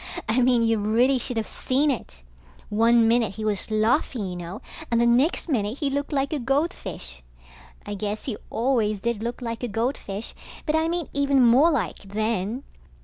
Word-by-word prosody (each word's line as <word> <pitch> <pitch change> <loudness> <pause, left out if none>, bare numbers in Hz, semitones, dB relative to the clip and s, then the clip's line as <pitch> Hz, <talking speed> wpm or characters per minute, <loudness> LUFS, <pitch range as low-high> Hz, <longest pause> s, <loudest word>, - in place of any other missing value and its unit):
I 225 +4 +2
mean 245 -1 +4
you 225 -1 +2
really 240 +6 +3
should 245 -1 -2
of 220 - 0
seen 280 +3 0
it. 65 - -6 0.5
One 230 +2 +4
minute 225 -4 +2
he 215 0 -4
was 210 -1 -1
laughing 220 +1 +1
you 180 -1 -5
know, 175 +4 -6 0.3
and 235 - +2
the 235 - +4
next 255 +11 +2
minute 225 -5 -1
he 285 -2 -1
looked 285 +2 -2
like 280 +1 0
a 300 - -1
goldfish. 235 - -2 0.6
I - - -4
guess 205 +1 -4
he 245 - -2
always 225 -4 +1
did 235 -1 -1
look 235 +2 -4
like 230 -1 -4
a 245 - -1
goldfish, 225 -2 -3 0.3
but 305 - +1
I 320 0 +2
mean 340 -2 -2
even 280 -2 +3
more 260 +8 +6
like, 290 -8 -1
then. 215 +3 -2
235 Hz, 185 wpm, -25 LUFS, 215-270 Hz, 0.6 s, more